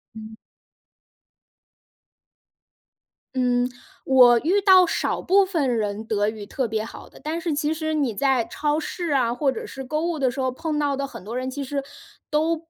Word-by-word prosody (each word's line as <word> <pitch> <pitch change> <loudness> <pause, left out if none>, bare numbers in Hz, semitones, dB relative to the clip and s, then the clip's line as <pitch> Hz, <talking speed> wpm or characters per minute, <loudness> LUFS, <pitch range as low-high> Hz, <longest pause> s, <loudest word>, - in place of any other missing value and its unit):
嗯。 220 0 -9 3.0
嗯， 245 -1 +1 0.4
我 250 -3 +6
遇 370 - +2
到 375 -2 +7
少 - - -1
部 390 +2 +4
分 290 -10 0
人 210 0 -2
德 210 -1 +1
语 215 -2 -7
特 255 +4 -2
别 220 -1 -2
好 225 - -10
的， - - -16
但 315 +3 -2
是 335 -2 -2
其 300 +1 0
实 315 0 -2
你 280 -7 0
在 265 -1 +2
超 295 +6 -1
市 345 +2 -4
啊， 245 -4 +2
或 270 +2 +1
者 245 - -6
是 265 - -8
购 305 +4 -2
物 345 -2 -1
的 265 -3 +1
时 270 - -7
候， 260 -1 0
碰 305 +3 -3
到 290 -1 +1
的 275 +1 -2
很 270 - -10
多 225 +5 -5
人 255 +1 -2
其 280 +1 -4
实 275 +1 -3 0.5
都 320 +2 +1
270 Hz, 195 characters per minute, -23 LUFS, 240-310 Hz, 3.0 s, 到